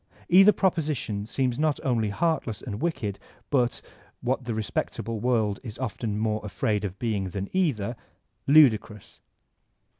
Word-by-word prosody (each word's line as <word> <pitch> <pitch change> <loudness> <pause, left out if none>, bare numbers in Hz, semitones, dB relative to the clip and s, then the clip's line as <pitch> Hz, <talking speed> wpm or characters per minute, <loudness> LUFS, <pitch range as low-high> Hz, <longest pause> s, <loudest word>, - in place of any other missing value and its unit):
Either 195 +4 +8
proposition 150 - -1
seems 125 +1 -1
not 155 -1 +1
only 115 -5 +1
heartless 125 -2 -1
and 105 -3 -6
wicked 115 - -2 0.3
but, 125 -4 +1 0.2
— - - -30
what 125 +1 -1
the 120 -2 -2
respectable 110 +1 -3
world 110 -4 +1
is 110 -4 -8
often 115 -3 -3
more 110 0 0
afraid 105 +1 -1
of 100 -1 -4
being 105 -5 -1
than 100 +1 -4
either, 125 - 0 0.3
— - - -47
^ludi* 140 -7 +7
crous. 105 -2 -14
115 Hz, 150 wpm, -26 LUFS, 105-140 Hz, 0.3 s, Either